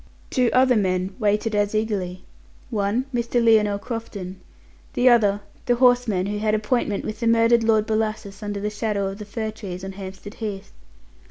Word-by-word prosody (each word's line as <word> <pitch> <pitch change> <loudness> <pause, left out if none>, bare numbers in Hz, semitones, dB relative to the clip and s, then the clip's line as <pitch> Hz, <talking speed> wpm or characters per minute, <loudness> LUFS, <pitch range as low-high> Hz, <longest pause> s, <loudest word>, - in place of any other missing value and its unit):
Two 250 -3 +3
other 255 -1 +4
men 185 -2 0
waited 210 +1 +1
as 205 0 +1
eagerly. 195 -4 -2 0.5
One, 215 +3 0
Mr. 240 0 -2
Lionel 215 -3 +4
Crofton; 200 -5 -6 0.5
the 250 - +2
other, 205 -4 +4 0.3
the 245 - +4
horseman 245 -6 +3
who 205 +1 -2
had 215 0 +1
appointment 215 -1 -1
with 215 0 -5
the 230 - 0
murdered 230 0 +4
Lord 220 -1 +3
Bellasis 215 -2 -2
under 205 -1 -4
the 210 +1 -2
shadow 205 -2 -1
of 195 +2 -8
the 210 - -7
fir 220 +1 -4
trees 190 -4 -7
on 195 - -5
Hampstead 190 +1 -9
Heath. 205 -4 -6
215 Hz, 170 wpm, -23 LUFS, 200-230 Hz, 0.5 s, other